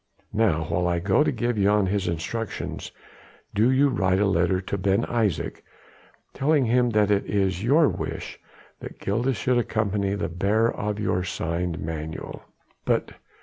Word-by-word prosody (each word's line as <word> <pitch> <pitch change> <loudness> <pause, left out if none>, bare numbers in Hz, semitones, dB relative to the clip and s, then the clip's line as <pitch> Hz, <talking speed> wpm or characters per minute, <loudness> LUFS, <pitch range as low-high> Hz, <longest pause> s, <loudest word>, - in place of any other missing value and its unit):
Now 100 -7 +2
while 90 +3 -1
I 85 0 +1
go 95 - +3
to - - +1
give 120 -2 -1
Jan 100 0 +3
his 95 0 -1
instructions 95 +7 -4 0.6
do 110 +4 +3
you 135 +2 +4
write 95 -7 +1
a 105 - +3
letter 90 -1 +2
to 95 +1 -4
Ben 95 0 +1
Isaje, 105 -11 -1 0.7
telling 140 0 +2
him 120 +1 +3
that 105 -2 +2
it 100 -1 +1
is 95 -2 0
your 145 +6 +5
wish - - -5 0.4
that - - -9
Gilda 120 +6 0
should 125 +1 +1
accompany 100 -3 0
the 100 - -2
bearer 100 +6 +1
of 105 0 -3
your 90 -3 0
sign 85 -1 -2
manual." 80 0 -6 0.4
"But...." - - 0
100 Hz, 155 wpm, -25 LUFS, 90-115 Hz, 0.7 s, your